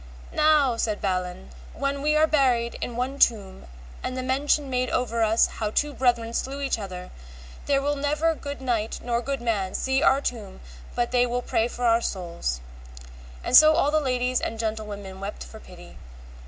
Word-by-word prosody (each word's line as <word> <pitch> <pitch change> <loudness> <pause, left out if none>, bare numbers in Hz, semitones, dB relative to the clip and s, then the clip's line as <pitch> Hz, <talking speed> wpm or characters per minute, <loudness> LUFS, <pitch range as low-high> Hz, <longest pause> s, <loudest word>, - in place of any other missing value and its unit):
Now, 300 -5 +3
said 215 -2 -1
Balin, 180 - -3 0.2
when 275 0 -2
we 300 +1 +2
are 310 +1 +5
buried 255 -6 +2
in 240 - -4
one 260 +3 -3
tomb, 200 - +1 0.3
and 255 - -4
the 255 - -3
mention 280 +3 +1
made 255 -1 -1
over 235 -2 -1
us 220 +1 +4
how 215 -2 -3
two 295 +7 0
brethren 240 -3 +1
slew 270 +3 -3
each 275 -4 -1
other, 185 -3 -7 0.6
there 275 -1 +2
will 290 +1 0
never 300 +3 +1
good 285 -3 -7
knight, 230 -4 -1
nor 235 -1 0
good 275 0 -3
man, 205 -5 -1
see 265 +1 0
our 275 -4 +4
tomb 225 -8 -5 0.4
but 240 0 0
they 245 0 +3
will 245 +1 -2
pray 225 -1 +1
for 245 0 -4
our 230 0 +4
souls. 170 - -3 0.8
And - - +1
so 310 0 +9
all 285 - +2
the 310 - +3
ladies 250 -2 0
and 225 - -3
gentlewomen 210 -3 -5
wept 200 +2 -6
for 220 - -12
pity. 175 -4 -14
245 Hz, 180 wpm, -25 LUFS, 215-275 Hz, 0.8 s, so